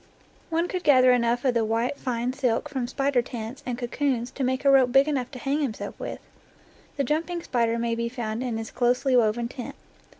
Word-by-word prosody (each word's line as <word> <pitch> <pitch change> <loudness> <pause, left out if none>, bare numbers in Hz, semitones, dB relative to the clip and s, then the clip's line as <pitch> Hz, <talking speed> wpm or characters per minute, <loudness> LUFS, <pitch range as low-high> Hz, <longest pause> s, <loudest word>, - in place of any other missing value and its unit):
One 335 +1 0
could 365 -1 -4
gather 255 -3 +6
enough 245 +1 +1
of 255 - +3
the 230 -1 +2
white 225 +4 0
fine 245 -1 -2
silk 260 0 0
from 265 -4 -3
spider 275 0 +1
tents 235 +1 -7
and 245 -1 -2
cocoons 245 -1 -1
to 275 - -4
make 260 +2 -1
a 275 - +7
rope 260 -2 +5
big 270 +3 +5
enough 265 -5 -1
to 265 - -9
hang 275 +4 -1
himself 255 -7 -3
with'. - - -5 0.8
The 280 - +1
jumping 330 +5 -1
spider 235 -2 0
may 235 0 -1
be 235 0 -2
found 235 -2 -4
in 245 -3 -2
his 225 -1 -6
closely 250 +2 +2
woven 235 0 +2
tent. 265 +2 -7
250 Hz, 205 wpm, -26 LUFS, 235-275 Hz, 0.8 s, a